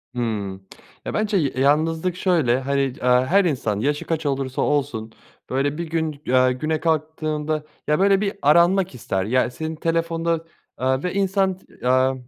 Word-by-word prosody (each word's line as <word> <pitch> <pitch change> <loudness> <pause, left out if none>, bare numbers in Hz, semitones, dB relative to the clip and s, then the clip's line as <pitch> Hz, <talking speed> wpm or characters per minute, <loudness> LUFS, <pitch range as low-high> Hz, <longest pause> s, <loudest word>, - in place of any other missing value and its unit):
Hı. 120 - -1 0.8
Ya, - - -4
bence 210 -2 +1
ya 145 -6 +1
yalnızlık 160 +6 +1
şöyle, 160 -10 +2
hani, 140 +1 0
eee, 135 -1 -1
her 130 +10 +3
insan, 115 -10 -1
yaşı 145 +5 -1
kaç 165 -1 -2
olursa 135 -2 -1
olsun 135 -7 -1 0.4
böyle 140 +3 0
bir 170 - -2
gün, 160 -3 -2
eee, 130 0 +4
güne 155 +4 -2
kalktığında, 155 -1 -1 0.2
ya, 150 +3 +2
böyle, 195 0 +4
bir 200 -1 -1
aranmak 170 +2 +4
ister, 95 -4 -2
ya, 125 +3 +2
senin 160 +4 -5
telefonda, 165 0 -1 0.3
aaa, 130 +1 0
ve 180 - -2
insan, 195 -1 +1
t - - -24 0.2
eee, 130 +1 +3
150 Hz, 160 wpm, -22 LUFS, 130-170 Hz, 0.8 s, eee